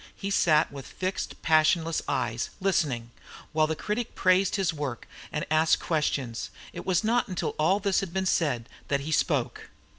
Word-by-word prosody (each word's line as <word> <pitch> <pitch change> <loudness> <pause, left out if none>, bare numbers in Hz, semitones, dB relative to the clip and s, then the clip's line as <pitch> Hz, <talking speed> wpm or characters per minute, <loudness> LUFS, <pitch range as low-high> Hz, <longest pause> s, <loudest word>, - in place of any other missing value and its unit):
He 200 0 -4
sat 160 -5 +3
with 140 -2 -8
fixed 185 +1 -4
passionless 160 +1 +3
eyes, 120 0 -1
listening, 145 -11 0 0.4
while 155 0 +3
the 160 - -1
critic 220 +7 -3
praised 185 +1 +3
his 190 -5 +1
work 145 -6 -5 0.2
and 150 - -2
asked 155 0 +4
questions. 140 -7 -1 0.2
It - - -8
was 185 +1 +2
not 235 +2 +2
until 185 -3 -2
all 185 +6 +3
this 200 -1 +2
had 195 -3 -4
been 190 +1 -1
said 140 -10 +1 0.2
that 140 -1 0
he 155 +3 -5
spoke. - - 0
160 Hz, 170 wpm, -27 LUFS, 145-190 Hz, 0.4 s, asked